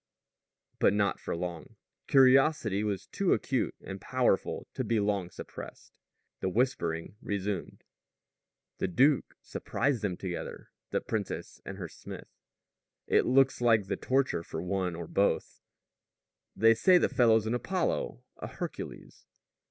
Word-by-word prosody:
But - - +4
not 100 -1 +1
for - - -4
long. 85 -1 -5 0.3
Curiosity 130 -5 +4
was 100 -2 -2
too 195 -2 +1
acute 130 -3 -1
and 95 -1 -7
powerful 125 -6 0
to - - -2
be 115 -2 +1
long 100 -3 0
suppressed. - - -10 0.4
The 95 - -1
whispering 95 -6 -1
resumed: 100 -2 -3 1.0
"The - - 0
duke 135 - +2
surprised 140 -5 -1
them 95 -4 -2
together 90 -3 -6 0.2
the - - 0
princess 105 -3 -4
and 95 - -6
her 90 -4 -5
smith." - - -10 0.7
"It - - +3
looks 130 0 +4
like 115 -4 +4
the 95 - -2
torture 135 -9 +1
for 80 - -6
one 90 0 -1
or 85 0 -5
both." 100 +5 0 0.9
"They 115 +2 +6
say 180 +11 +5
the - - +3
fellow's 110 -3 +4
an 110 - -1
Apollo, 165 - -1
a - - -6
Hercules." - - -7
105 Hz, 135 wpm, -30 LUFS, 95-130 Hz, 1.0 s, They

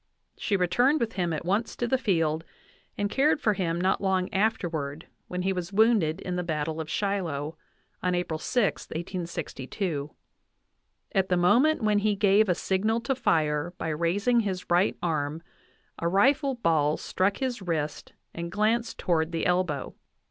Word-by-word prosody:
She 200 - 0
returned 245 - +3
with 230 -3 -1
him 175 -3 -1
at 160 +1 -3
once 205 +5 0
to 240 - -1
the 260 +2 +1
field, 165 - +1 0.5
and 205 - 0
cared 290 +8 +2
for 215 -7 +2
him 170 -4 -1
not 185 +2 +1
long 190 -2 0
afterward 165 -8 -1 0.2
when 180 0 -3
he 190 +1 +1
was 180 0 -4
wounded 200 -6 +3
in 180 -1 -3
the 180 - -1
battle 160 -1 -2
of 155 - -7
Shiloh, 165 -7 -2 0.5
on 180 0 +1
April 170 -3 -2
6, 235 +3 0
1862. 170 -2 -4 1.0
At 190 -2 +1
the 180 - +3
moment 245 - +4
when 210 -1 +3
he 210 0 +1
gave 200 +1 +4
a 180 - +3
signal 210 +6 0
to 270 - 0
fire 160 - 0
by 160 - -3
raising 180 +10 +1
his 190 -5 -3
right 180 +3 +3
arm 155 -1 -1 0.6
a 170 - 0
rifle 265 - +3
ball 160 -8 +2
struck 195 +2 0
his 255 -4 -2
wrist 155 -5 -3 0.2
and 170 0 -5
glanced 225 +4 0
toward 165 -2 0
the 165 - -2
elbow. 180 -6 0
180 Hz, 165 wpm, -27 LUFS, 165-210 Hz, 1.0 s, moment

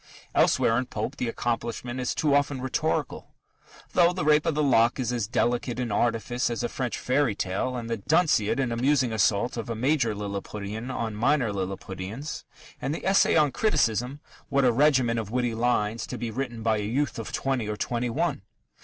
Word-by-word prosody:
Elsewhere 115 +1 +3
in 125 - -3
Pope 110 +6 -4
the 125 - -2
accomplishment 120 +1 -3
is 125 - -1
too 150 -2 +1
often 145 -1 +2
rhetorical, 130 0 -2 0.6
though 175 0 +5
The 180 -4 -3
Rape 150 0 +4
of 160 - +1
the 150 - +1
Lock 120 -2 +3
is 125 -1 -1
as 115 -5 -1
delicate 120 +1 0
in 120 -3 -2
artifice 120 +3 0
as 120 - -3
a 120 - -1
French 125 -3 -3
fairy 130 -4 +1
tale, 100 +7 -2
the 115 0 -3
Dunciad 145 - +2
an 130 -3 0
amusing 130 0 +2
assault 110 +3 +1
of 115 +1 -4
a 115 - -2
major 125 -2 +1
Lilliputian 105 +3 -5
on 115 -4 -3
minor 115 +1 +1
Lilliputians, 95 +7 -5 0.4
and 145 - -1
the - - -7
Essay 195 +1 +4
on 150 -3 +4
Criticism 130 - 0 0.3
what 140 -2 +2
a 125 - +5
regiment 130 -3 +3
of 110 -3 -5
witty 120 0 0
lines 115 -1 0
to - - -5
be 115 -2 -4
written 120 -2 -4
by 110 -1 +2
a - - -2
youth 120 +4 -1
of 115 - -6
twenty 130 -5 -1
or 105 - -3
twenty 120 +2 -1
one! 115 - -1
120 Hz, 190 wpm, -26 LUFS, 110-135 Hz, 0.6 s, though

